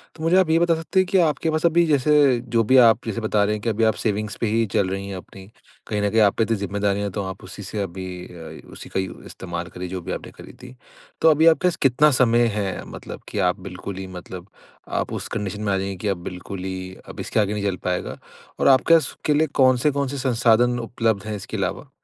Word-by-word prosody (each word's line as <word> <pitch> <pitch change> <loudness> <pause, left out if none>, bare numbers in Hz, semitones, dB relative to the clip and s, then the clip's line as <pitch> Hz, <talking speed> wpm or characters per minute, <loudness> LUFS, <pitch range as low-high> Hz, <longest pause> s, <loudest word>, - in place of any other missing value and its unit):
तो 160 - -9
मुझे 170 +3 +3
आप 185 -4 +3
ये 160 - +4
बता 170 -1 +3
सकते 165 +4 -1
हैं 185 - +4
कि 195 - +3
आपके 160 -1 +1
पास 155 +1 0
अभी 170 +1 +4
जैसे, 145 -3 +3
जो 115 -1 0
भी 130 +4 +4
आप 115 -3 +5
जैसे 115 +1 -3
बता 105 -1 +1
रहे 105 +1 +1
हैं, 105 - -7
कि 115 - -1
अभी 115 +1 0
आप 110 0 +4
सेविंग्स 105 -1 -1
पे 115 - +1
ही 115 +2 +1
चल 95 - +2
रही 95 +1 -4
हैं, 95 - -5
अपनी। 95 +2 -12 0.4
कहीं 105 -1 -1
न 105 - +1
कहीं 110 +1 +3
आप 100 -2 +4
पे 115 - +3
इतनी 115 0 0
ज़िम्मेदारियाँ 100 +1 -1
है, - - -5
तो 100 +2 -3
आप 95 0 -7
उसी 95 +2 -9
से 105 +2 -5
अभी 95 0 -5 0.2
अ, 85 -2 -10
उसी - - -11
का - - -2
यू 95 -1 -5
इस्तेमाल 85 -1 -6
करिए, 90 0 -7
जो 95 0 -5
भी - - -6
आपने - - -6
करी - - -12
थी। 125 0 -11 0.5
तो 160 - +6
अभी 155 +2 +3
आपके 165 +2 +4
पास 175 - +1
कितना 145 +4 +4
समय 120 -1 +4
है, 95 -3 -2
मतलब - - -9
कि - - -3
आप 90 - -3
बिल्कुल 95 +1 -7
ही 95 0 -6
मतलब 90 0 -9 0.5
आप - - -3
उस - - -4
कंडीशन 105 0 -3
में 100 -2 0
आ - - +1
जाएँगी 95 0 -3
कि 95 - -4
अब 90 -3 -2
बिल्कुल 90 +1 -7
ही 95 0 -5
अब - - -10
इसके - - -1
आगे 105 -1 +1
नहीं 105 -1 -3
चल 100 -2 0
पाएगा। 90 0 -2 0.4
और - - +2
आपके 135 +5 +5
पास 165 - +4
उसके 150 - -2
लिए 155 +2 +2
कौन-से 130 +3 +4
कौन-से 140 0 -2
संसाधन 120 -1 +2
उपलब्ध 115 -3 -1
हैं, 110 - -3
इसके 105 +2 -6
अलावा? 95 +8 -3
110 Hz, 255 wpm, -22 LUFS, 95-130 Hz, 0.5 s, तो